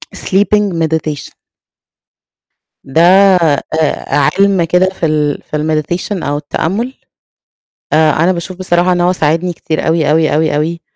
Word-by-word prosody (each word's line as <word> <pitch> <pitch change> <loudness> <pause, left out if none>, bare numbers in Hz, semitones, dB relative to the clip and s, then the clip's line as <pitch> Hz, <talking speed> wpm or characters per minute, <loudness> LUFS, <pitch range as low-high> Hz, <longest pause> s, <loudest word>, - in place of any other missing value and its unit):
sleeping 205 0 +1
meditation. 155 -2 -3 1.5
ده 145 +5 0
آآ 180 -5 +4 0.8
عِلم 195 -3 +3
كده 180 +3 +2
في 185 -3 -4
ال 150 -2 -1
في 150 - -5
الmeditation 155 +5 -2
أو 145 +1 -2
التأمل. 195 - -3 1.0
آآ 155 0 +4
أنا 185 - +3
باشوف 180 +1 -5
بصراحة 180 -1 +1
إن 175 0 +1
هو 180 +1 +2
ساعدني 165 +2 0
كتير 160 -1 -3
أوي، 160 -2 +1
أوي، 155 -1 +2
أوي، 155 -1 +1
أوي، 165 +3 -2
170 Hz, 130 wpm, -13 LUFS, 155-185 Hz, 1.5 s, آآ